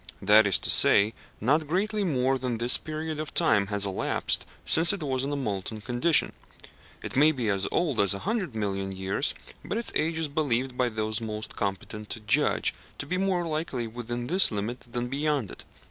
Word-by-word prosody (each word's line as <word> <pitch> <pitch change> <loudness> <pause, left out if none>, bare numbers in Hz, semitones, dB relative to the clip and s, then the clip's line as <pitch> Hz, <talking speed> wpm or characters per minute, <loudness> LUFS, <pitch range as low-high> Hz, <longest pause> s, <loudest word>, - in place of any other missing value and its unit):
That 105 +2 +5
is 95 - +3
to - - +1
say, 105 +3 +6 0.3
not 150 +7 +1
greatly 205 +6 -1
more 135 -6 0
than 125 -2 -2
this 120 +2 +5
period 155 0 -4
of 155 - -5
time 105 -12 +3
has 100 0 -1
elapsed 95 -1 -1 0.2
since 165 +1 +5
it 200 -5 -4
was 130 -2 -1
in 140 - -3
a - - -1
molten 110 -5 -4
condition. 125 +8 +1 0.7
It - - -5
may 150 +4 +5
be 125 -7 -2
as 100 -1 0
old 155 -9 0
as 100 -1 +4
a 100 - -8
hundred 200 - -2
million 100 -2 -3
years, 95 0 -1 0.3
but 210 - -4
its 235 - -4
age 160 +1 0
is 160 -1 0
believed 135 -4 -1
by 125 -1 +1
those 110 0 -2
most 110 -1 -5
competent 105 +1 -4
to - - -4
judge 115 +8 +1 0.2
to - - -4
be 180 +5 -2
more 190 -3 0
likely 155 -6 -3
within 120 +1 -5
this 185 +9 +4
limit 110 +4 -3
than 120 0 -3
beyond 140 -4 -1
it. - - -12
125 Hz, 195 wpm, -27 LUFS, 105-155 Hz, 0.7 s, say